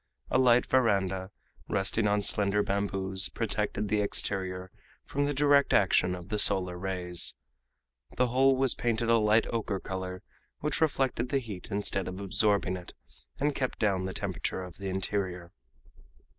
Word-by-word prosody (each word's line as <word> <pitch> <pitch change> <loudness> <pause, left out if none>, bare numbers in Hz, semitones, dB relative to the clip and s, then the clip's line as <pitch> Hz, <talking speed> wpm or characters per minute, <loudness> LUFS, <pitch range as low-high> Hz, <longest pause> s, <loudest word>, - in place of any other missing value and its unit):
A - - +3
light 125 -1 +5
veranda, 95 -7 +1 0.4
resting 105 +3 0
on 105 0 +1
slender 105 0 +1
bamboos, 95 -1 -1
protected 105 - -2
the 105 +1 +1
exterior 95 -2 -2 0.3
from 145 +1 -1
the 145 - -1
direct 145 0 +4
action 90 -2 +3
of 90 +1 -10
the 105 - -1
solar 90 -3 +4
rays. 90 -1 +1 0.8
The 125 - +4
whole 135 +2 +4
was 135 -1 +3
painted 115 -1 -1
a 115 - +5
light 105 +1 +3
ocher 105 -4 -2
color, 95 -1 -6 0.4
which 150 +2 -2
reflected 130 -5 0
the 140 - +1
heat 110 -8 -6
instead 100 -1 -1
of 95 +1 -6
absorbing 100 -1 +1
it, 90 - -11 0.4
and 145 +1 +1
kept 130 -2 -2
down 95 -3 0
the 95 - -3
temperature 95 - -3
of 90 -1 -10
the 100 -1 -5
interior. 95 -2 -3
100 Hz, 155 wpm, -29 LUFS, 95-120 Hz, 0.8 s, light